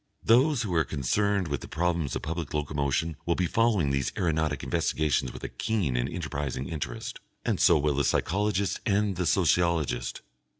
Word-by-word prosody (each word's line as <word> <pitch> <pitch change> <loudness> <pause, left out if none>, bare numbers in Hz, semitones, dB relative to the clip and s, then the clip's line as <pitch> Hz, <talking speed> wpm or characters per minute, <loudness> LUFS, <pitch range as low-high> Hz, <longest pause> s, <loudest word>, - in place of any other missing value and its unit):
Those 125 +3 +4
who 100 -5 -3
are 80 -2 +3
concerned 90 +8 0
with 70 -3 -3
the - - -8
problems 85 -4 -1
of - - -4
public 80 -2 -4
locomotion 75 +1 -1
will 85 - +2
be 90 - +1
following 105 -6 +2
these 70 -1 0
aeronautic 80 -4 0
investigations 75 -2 0
with - - -10
a - - -2
keen 100 - -1
and - - 0
enterprising 70 -2 -4
interest, 70 -6 -5 0.3
and - - 0
so 85 - +6
will 75 0 +1
the 70 +1 +1
physiologist 100 +6 0
and 105 -2 +1
the 90 -1 -1
sociologist. 85 -8 +1
80 Hz, 170 wpm, -28 LUFS, 70-95 Hz, 0.3 s, so